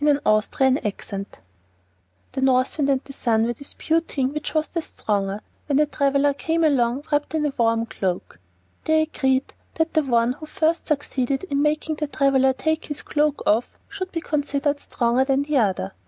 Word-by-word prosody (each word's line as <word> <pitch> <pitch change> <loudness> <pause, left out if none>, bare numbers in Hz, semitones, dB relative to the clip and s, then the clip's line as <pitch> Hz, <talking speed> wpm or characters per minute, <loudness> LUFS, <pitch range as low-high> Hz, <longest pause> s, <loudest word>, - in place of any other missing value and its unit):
Orthographic 215 +1 +1
version 195 -1 -5 1.0
The 265 - -3
North 255 +2 +2
Wind 280 -1 +2
and 270 -1 +2
the 275 - -11
Sun 225 -3 +1
were 240 - -1
disputing 285 +1 -2
which 300 +1 -4
was 310 0 +2
the 335 - -2
stronger, 200 -7 -2 0.3
when 285 -2 +2
a 300 - +5
traveler 280 0 +2
came 325 +3 -1
along 265 -3 +2
wrapped 295 +2 0
in 305 -1 +1
a 290 - -1
warm 230 -1 +2
cloak. 185 - -4 0.5
They 315 0 +4
agreed 265 -4 0 0.2
that 325 0 0
the 315 - +4
one 240 -3 +2
who 310 +3 -10
first 325 +2 0
succeeded 275 -2 -1
in 280 0 +2
making 305 +1 0
the 300 - -2
traveler 275 -2 +3
take 315 +4 -1
his 295 - -5
cloak 300 -1 0
off 225 +4 +1
should 375 -1 -5
be 330 - -3
considered 290 -1 -1
stronger 240 -1 +1
than 270 +1 +1
the 295 0 0
other. 190 - 0
280 Hz, 175 wpm, -23 LUFS, 245-300 Hz, 1.0 s, a